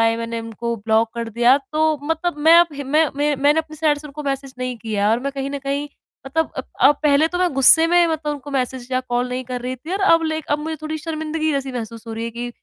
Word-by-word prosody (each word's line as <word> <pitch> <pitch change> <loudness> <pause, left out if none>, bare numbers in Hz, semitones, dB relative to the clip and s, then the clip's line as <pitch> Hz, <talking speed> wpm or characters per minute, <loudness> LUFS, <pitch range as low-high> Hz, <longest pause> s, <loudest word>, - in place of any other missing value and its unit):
आए। 225 0 +3
मैंने 230 0 -4
उनको 230 +1 -4
ब्लॉक 220 +1 +1
कर 235 -1 -4
दिया, 240 +4 +4
तो 305 +2 0
मतलब 325 +1 -1
मैं 320 +3 +6
अब 345 - +4
हिम 285 -1 -6
मैं 315 +1 +5
मैं 295 +1 +1
मैंने 290 +3 +3
अपनी 310 -1 -12
साइड 300 -1 +1
से 300 - -10
उनको 295 +1 -8
मैसेज 275 -1 -4
नहीं 255 -1 -3
किया 210 -3 -1
और 230 +2 +1
मैं 275 +1 -3
कहीं 275 0 -4
न 285 - -3
कहीं 280 +1 -3 0.4
मतलब 320 +4 -1 0.3
अ, 295 - +7
पहले 295 +1 +2
तो 355 - -3
मैं 360 -2 +1
गुस्से 275 +5 +6
में 345 0 +4
मतलब 310 -2 -2
उनको 290 0 -8
मैसेज 250 -1 -4
या 255 - +2
कॉल 245 +1 0
नहीं 255 +1 -4
कर 250 0 -5
रही 255 +1 -4
थी 310 +8 -8
और 390 - -1
अब 330 0 +4
ले 315 0 -1
अब 290 - +2
मुझे 315 +1 -4
थोड़ी 310 0 -4
शर्मिंदगी 315 0 -2
जैसी 275 -1 -2
महसूस 230 -1 -7
हो 225 - -6
रही 225 +1 -4
है 230 - -4
कि 240 +1 -5
280 Hz, 260 wpm, -21 LUFS, 245-310 Hz, 0.4 s, अ